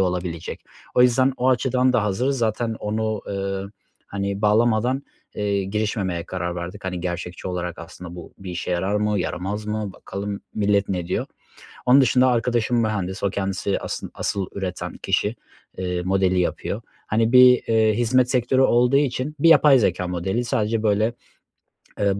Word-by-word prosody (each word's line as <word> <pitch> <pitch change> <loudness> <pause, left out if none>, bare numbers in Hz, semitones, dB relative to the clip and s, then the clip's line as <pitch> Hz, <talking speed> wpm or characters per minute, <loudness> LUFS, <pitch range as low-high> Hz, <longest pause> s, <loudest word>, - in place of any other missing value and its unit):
olabilecek. 90 -3 -2 0.3
O 125 - +6
yüzden 130 +2 +4
o 125 +1 +1
açıdan 130 0 +2
da 110 -4 +2
hazırız. 125 +7 0
Zaten 115 0 -1
onu, 110 0 -2
ııı, 100 0 -3 0.4
hani, 100 0 -3
bağlamadan, 115 +5 +2 0.3
eee, 100 -1 -1
girişmemeye 100 -4 -2
karar 90 -1 -3
verdik. 90 +4 -7
Hani, 90 -2 -3
gerçekçi 90 +1 -4
olarak 90 -2 -4
aslında 85 +1 -9
bu 85 -1 -10
bir 95 -2 -7
işe 90 0 -4
yarar 95 +4 0
mı, 105 -1 +1
yaramaz 95 +4 -3
mı, 105 -2 -3
bakalım 100 +2 -6
millet 100 -1 +1
ne 90 -3 -2
diyor? 90 - -2 0.6
Onun 130 +3 +7
dışında 130 0 +4
arkadaşım 120 -1 +1
mühendis, 100 -3 -2
o 100 - +2
kendisi 95 0 -2
asın - - -5
asıl 100 -2 -2
üreten 95 -2 -5
kişi, 105 +3 0 0.4
eee, 90 -1 -2
modeli 95 0 +2
yapıyor. 100 +4 -2 0.3
Hani, 115 +2 +1
bir, 125 -1 +7
eee, 110 -1 +3
hizmet 125 +2 +2
sektörü 130 +1 +2
olduğu 125 +1 +4
için 140 +1 -1
bir 165 +3 +5
yapay 150 -4 +7
zekâ 90 -4 0
modeli 90 +7 -1
sadece 110 -1 0
böyle, 110 +2 +2 0.9
ııı, 100 -1 +1
105 Hz, 155 wpm, -23 LUFS, 95-120 Hz, 0.9 s, Onun